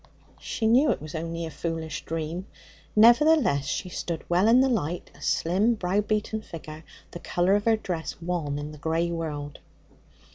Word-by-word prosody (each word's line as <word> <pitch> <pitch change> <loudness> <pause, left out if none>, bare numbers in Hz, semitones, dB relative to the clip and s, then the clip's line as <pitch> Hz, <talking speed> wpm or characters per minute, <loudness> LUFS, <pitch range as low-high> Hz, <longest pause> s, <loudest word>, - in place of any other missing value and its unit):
"' - - -29
She 225 - -3
knew 250 +7 +5
it - - +1
was 155 0 -9
only 165 +1 -4
a 160 - -6
foolish 160 -2 -4
dream; 165 +3 -4 0.5
nevertheless, 235 - +5
she 180 - -2
stood 170 -2 -5
well 180 +4 +3
in 235 +3 +6
the 265 - +4
light, 180 - -2
a - - -18
slim, 200 +8 +2
brow 195 0 0
beaten 215 +1 -1
figure, 155 -4 -9 0.3
the 175 - -7
colour 175 +2 +1
of 205 0 +1
her 225 -1 +4
dress 175 -6 -5
wan 165 -4 -2
in 145 +1 -5
the 150 - -12
grey 165 +3 0
world. 150 -3 -5
175 Hz, 180 wpm, -26 LUFS, 160-215 Hz, 0.5 s, in